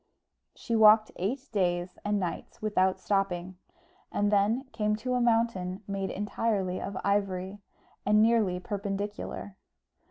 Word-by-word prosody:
She 230 - -3
walked 215 0 +6
eight 255 +9 -2
days 180 -3 -1
and 205 0 0
nights 180 -3 -5
without 190 -3 +1
stopping, 185 -2 -1 0.5
and 205 0 +1
then 210 +5 +2
came 210 -3 0
to 250 +4 -3
a 250 - +1
mountain 225 -5 +1
made 195 -1 -2
entirely 200 -2 -1
of 200 -1 -5
ivory, 195 -1 -1 0.4
and 210 +1 +4
nearly 215 -5 +3
perpendicular. 200 0 -4
205 Hz, 125 wpm, -29 LUFS, 190-215 Hz, 0.5 s, walked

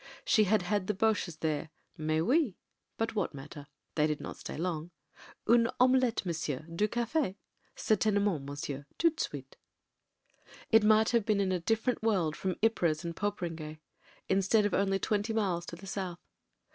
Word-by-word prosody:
She 215 - +4
had 205 -1 +2
had 200 +1 -1
the 210 - 0
Boches 205 -5 +1
there 155 -1 -2 0.2
— - - -41
"mais 155 +1 +2
oui" 255 - +2 0.2
— - - -52
but 225 0 -1
what 200 -8 -1
matter? 145 +1 -9 0.3
They 150 -1 +2
did 150 -1 -2
not - - -6
stay - - -7
long. 165 -1 -2 0.6
"Une 230 0 +5
omelette, 255 -3 +3
monsieur; 155 -5 -2
du 210 +5 +2
cafe? 235 - -1 0.4
Certaine 215 -1 +2
ment, 180 -9 0
monsieur. 140 0 -5
Toute 330 -1 +2
de - - +1
suite." - - -7 1.1
It 225 -1 +6
might 215 +1 +5
have 235 -2 +3
been 210 -1 +1
in 195 -1 +1
a 180 - +1
different 225 +7 0
world 185 -9 +1
from 185 -1 -2
Ypres 170 -7 +2
and 170 -1 -4
Poperinghe 170 -7 -3 0.3
— - - -29
instead 195 +3 +3
of 205 - 0
only 195 0 +2
twenty 210 +3 -1
miles 185 -6 0
to - - -6
the 180 +3 -12
south. 190 -3 -4
195 Hz, 180 wpm, -31 LUFS, 165-220 Hz, 1.1 s, It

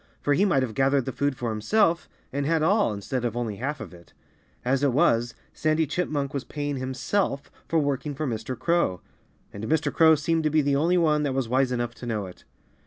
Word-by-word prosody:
For 145 - +1
he 190 +8 +3
might 155 -9 +2
have 115 -4 -3
gathered 135 +1 +2
the 130 - -2
food 140 0 -1
for 120 -2 -2
himself, 170 - +1 0.2
and 140 +1 -1
had 160 -1 +2
all, 205 - +3
instead 110 +5 -3
of 120 -1 -2
only 115 -4 -3
half 145 +5 -3
of - - -8
it. 85 -1 -16 0.5
As 130 +2 +1
it 140 -3 +2
was, 120 -3 +2 0.2
Sandy 155 +1 +1
Chipmunk 145 -3 -2
was 140 -2 -2
paying 145 -1 -4
himself 135 +4 -2 0.2
for 165 - +1
working 145 -1 -1
for 155 - -3
Mr. 115 0 -4
Crow. 170 - +1 0.5
And 100 +2 -6
Mr. 160 +4 0
Crow 160 -1 +6
seemed 160 +2 0
to - - +4
be 155 0 +2
the 140 0 +2
only 170 +6 +2
one 155 -3 +3
that 140 -3 -1
was 135 -3 0
wise 130 +2 +2
enough 120 -1 -2
to 120 +1 -9
know 110 -4 -2
it. 90 - -13
140 Hz, 220 wpm, -26 LUFS, 120-155 Hz, 0.5 s, Crow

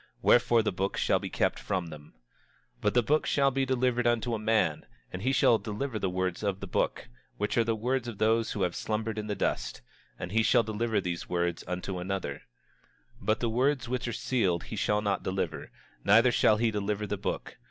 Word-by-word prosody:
Wherefore 120 -1 +5
the - - 0
book 95 +2 -2
shall - - +2
be - - -5
kept - - 0
from 90 -4 -2
them. 75 -1 -12 0.6
27:9 - - -33
But 105 - +1
the 120 - +5
book 150 +6 +1
shall 140 -1 +3
be 135 0 0
delivered 125 -2 +1
unto 120 0 +1
a 110 - -1
man, 110 +1 +1 0.3
and 90 - -5
he 130 +5 +1
shall 120 -4 +4
deliver 110 +2 -4
the 95 - 0
words 90 -1 -2
of 100 -2 -1
the 100 - -5
book, 90 - -1 0.3
which 105 +1 -1
are 115 - +4
the 115 0 0
words 125 +3 -1
of 115 -4 -6
those 110 +1 +2
who 100 - -1
have 90 -1 -1
slumbered 110 0 -2
in 105 - -5
the 105 - -2
dust, - - -2 0.4
and 90 - -6
he 110 +2 +3
shall 120 +1 +4
deliver 110 0 -1
these 90 -2 -4
words 85 -1 -1
unto 90 +1 -3
another; 90 -6 -3 0.8
27:10 - - -14
But 110 +1 +2
the 120 - +1
words 130 +2 +1
which 125 0 -2
are - - -1
sealed 95 -10 0
he - - -7
shall 105 0 +1
not 100 -1 0
deliver, 95 -4 -3 0.3
neither 115 +5 +6
shall 110 -2 +4
he 115 0 +2
deliver 105 0 -2
the - - -2
book. - - -4
110 Hz, 215 wpm, -29 LUFS, 95-120 Hz, 0.8 s, neither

